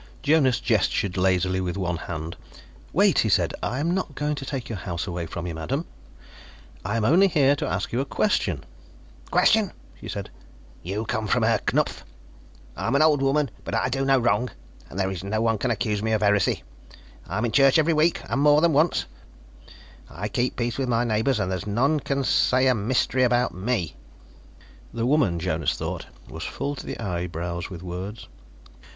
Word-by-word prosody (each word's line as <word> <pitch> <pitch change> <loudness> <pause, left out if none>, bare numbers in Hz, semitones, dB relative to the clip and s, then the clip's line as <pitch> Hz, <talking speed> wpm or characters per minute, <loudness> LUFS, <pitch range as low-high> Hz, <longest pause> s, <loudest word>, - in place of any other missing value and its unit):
Jonas 145 -5 +3
gestured 95 -3 +1
lazily 95 0 +1
with 90 0 -3
one 90 -3 -1
hand. 80 -1 -6 0.6
"Wait," - - +4
he - - +2
said. - - +2
"I 125 - -2
am 165 +4 0
not 180 -6 -3
going 150 0 -1
to 140 -2 -5
take 130 -4 -4
your 110 -5 -5
house 85 0 -4
away 85 -3 -4
from 85 +2 -6
you, 85 - -4
madam. 130 - -3 1.0
I 105 +3 -1
am 110 - 0
only 180 - +5
here 145 -5 +3
to 150 - -2
ask 90 +2 -2
you 120 - +1
a - - -2
question." 205 +9 0 0.7
"Question?" 215 -4 +3 0.3
she - - -9
said. - - -5 0.5
"You 100 +5 -3
come 110 -3 -2
from 125 +2 +2
Herr 110 -1 +3
Knupf? - - 0 0.7
I'm 115 - -1
an 145 - +5
old 150 -3 +4
woman 135 -1 +1
but - - -4
I - - +1
do 135 +1 -1
no 135 0 +4
wrong, 120 0 +1 0.4
and - - -9
there 95 -1 0
is 90 -2 -5
no 105 +2 -1
one 115 -1 +1
can 130 - -1
accuse 105 -2 -1
me 110 +1 0
of 110 -1 +1
heresy. 100 -3 +2 0.6
I - - -3
am 110 - 0
in 115 - -1
church 135 +2 +5
every 160 +1 +3
week, 160 +2 +2
and 140 - 0
more 150 0 +6
than 165 0 +3
once; 155 +4 +2 1.0
I 95 - -5
keep 125 +4 -1
peace 120 +1 -2
with 130 -2 -1
my 115 0 +2
neighbors 115 +2 +1
and 95 -2 -1
there's 95 +1 -3
none 135 +9 +2
can 140 0 -1
say 130 0 +3
a 130 - +5
mystery 125 +4 0
about 125 0 +2
me 95 -4 -2 0.5
" - - -24
The 115 0 -1
woman, 130 - +2
Jonas 80 -2 -1
thought, - - -5 0.2
was 80 - -7
full 145 - -3
to - - -8
the - - -5
eyebrows 85 -3 -3
with 90 -2 -8
words. 95 +5 -6
115 Hz, 195 wpm, -25 LUFS, 95-135 Hz, 1.0 s, more